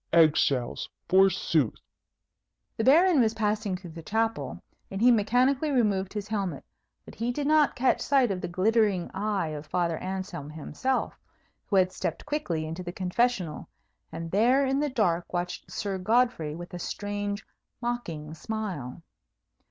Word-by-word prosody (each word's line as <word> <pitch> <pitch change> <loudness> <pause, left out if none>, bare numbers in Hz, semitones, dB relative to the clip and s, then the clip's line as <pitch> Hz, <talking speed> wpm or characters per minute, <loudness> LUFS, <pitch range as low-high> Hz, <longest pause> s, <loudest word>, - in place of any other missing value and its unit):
Egg 160 -2 +6
shells, 125 -4 0 0.2
forsooth!" 185 - +3 1.0
The 225 - -1
Baron 320 +5 +6
was 225 -1 +2
passing 210 -3 0
through 180 -2 -10
the 165 +1 -9
chapel, 225 +6 -1 0.3
and 195 - -4
he 245 +3 +6
mechanically 250 +7 +3
removed 205 -8 +1
his 210 -1 -4
helmet; 195 -9 -3 0.4
but - - -11
he 235 +2 -2
did 285 +3 -3
not 305 0 +4
catch 260 +1 +2
sight 265 -5 +3
of 185 -2 -3
the - - -3
glittering 195 0 +1
eye 200 -4 -1
of 150 -1 -6
Father 170 0 0
Anselm 185 -6 -5
himself, 255 - -2 0.5
who 200 - 0
had 185 -1 +4
stepped - - -4
quickly 185 - -2
into 165 +3 -5
the 175 -1 -5
confessional, 185 -2 -1 0.4
and 165 0 -6
there 245 +7 +4
in 270 +1 +1
the 295 0 +1
dark 180 -9 0
watched 180 0 -4
Sir 200 -3 -3
Godfrey 215 -7 +1
with 175 +1 -9
a 175 - -5
strange, 205 +1 -3 0.3
mocking 175 -11 -4
smile. 175 - -5
200 Hz, 150 wpm, -27 LUFS, 175-235 Hz, 1.0 s, Egg